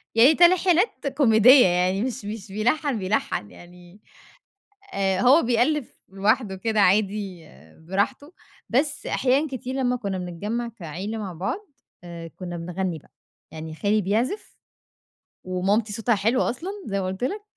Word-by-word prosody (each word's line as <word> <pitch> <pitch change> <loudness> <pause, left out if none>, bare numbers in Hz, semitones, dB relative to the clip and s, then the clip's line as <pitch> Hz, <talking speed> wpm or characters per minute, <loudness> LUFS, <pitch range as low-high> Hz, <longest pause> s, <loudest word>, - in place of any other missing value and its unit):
يعني 255 +7 +6
تلحينات 355 +1 +3
كوميدية 250 -1 +7
يعني 180 +2 +1
مش 245 -5 -4
مش 210 -1 -6
بيلَحَّن 245 +5 0
بيلَحَّن، 185 - -2
يعني 175 +3 -16 0.9
آآ 190 -1 0
هو 270 +6 +6
بيألِّف 245 +4 0
لوحده 200 +2 0
كده 220 +3 -1
عادي 195 -2 +1 0.4
براحته، 255 - -2 0.4
بس 280 +4 0
أحيانًا 270 +4 +1
كتير 260 -1 -6
لمّا 250 -2 +1
كُنّا 200 -6 -3
بنتجمَّع 205 +7 -4
كعيلة 195 +1 -6
مع 200 -4 -5
بعض، 200 - -4 0.3
آآ 170 -1 -8
كُنّا 175 +1 -8
بنغنّي 175 0 -3
بقى. - - -26 0.4
يعني 160 0 -8
خالي 210 +5 +1
بيعزف 225 - -2 0.9
ومامتي 200 +4 0
صوتها 225 +1 +1
حلو 225 +6 +1
أصلًا 330 +11 -2
زي 200 -1 -2
ما 185 - -3
قُلت 190 +4 -5
لك، 405 +10 -2
215 Hz, 135 wpm, -24 LUFS, 185-255 Hz, 0.9 s, كوميدية